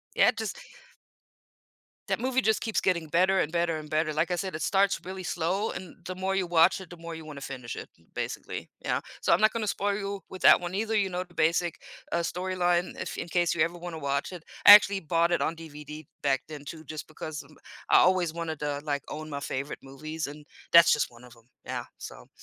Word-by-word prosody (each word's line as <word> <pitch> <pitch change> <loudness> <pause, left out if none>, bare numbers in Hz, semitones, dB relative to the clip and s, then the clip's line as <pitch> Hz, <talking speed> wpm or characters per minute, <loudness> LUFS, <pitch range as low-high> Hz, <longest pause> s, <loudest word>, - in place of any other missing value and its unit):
Yeah, - - +6
it - - +1
just - - -3 1.5
That - - 0
movie 260 +1 +1
just 220 -1 +2
keeps 225 - 0
getting 170 -4 +1
better, 185 +4 +3
and 155 - -1
better, 170 -1 +1
and 155 -1 -7
better, 155 0 0
like 155 +4 0
I - - +2
said, 190 -2 -3
it - - -5
starts 200 0 +2
really 185 0 -6
slow, 180 +5 -1
and 185 -2 -7
the 185 0 -5
more 190 +1 -1
you 190 -2 0
watch 170 +2 +4
it, 185 - -11
the 175 - -9
more 165 0 -7
you 160 -1 -9
wanna 145 -2 -9
finish 130 -3 -6
it - - -7
m 80 - -27
basically, - - -5 0.2
yeah, - - 0 0.2
so - - +2
I'm - - +5
not 215 0 +5
gonna 225 -2 -2
spoil 200 0 0
you 200 -1 -4
with 185 - -9
that - - +8
one 175 +1 -5
either, 220 +2 0
you 200 -2 +2
know, 180 0 -3
the 175 -1 -22
basic, 170 +1 +1 0.3
uh, 170 - +2
storyline 180 0 0
if - - -4
in 170 - -5
case 175 -1 +1
you 155 - +2
ever 170 +1 -1
wanna 170 -2 -6
watch 140 +4 -2
it. 175 -3 -9 0.2
I 205 - +14
actually 200 -1 +8
bought 170 +2 +1
it - - +2
on 165 - 0
DVD 150 -1 -9 0.2
back 135 -2 +2
then 150 -2 -8
too 160 +2 -8
just 155 +1 -7
because 155 -1 -7
m 150 +1 -19 0.3
I - - +8
always 180 -3 +3
wanted 165 -3 -4
to, 145 -1 -2
like, 145 -2 -1
own 155 0 -6
my 140 0 -4
favorite 140 +1 -4
movies, 155 +3 -5
and 150 +1 -10 0.3
that's 170 +1 +8
just 150 - +1
one 120 +1 -16
of 120 -1 -14
'em, 115 +1 -23 0.2
yeah, - - -4
so - - -10
170 Hz, 235 wpm, -28 LUFS, 150-185 Hz, 1.5 s, I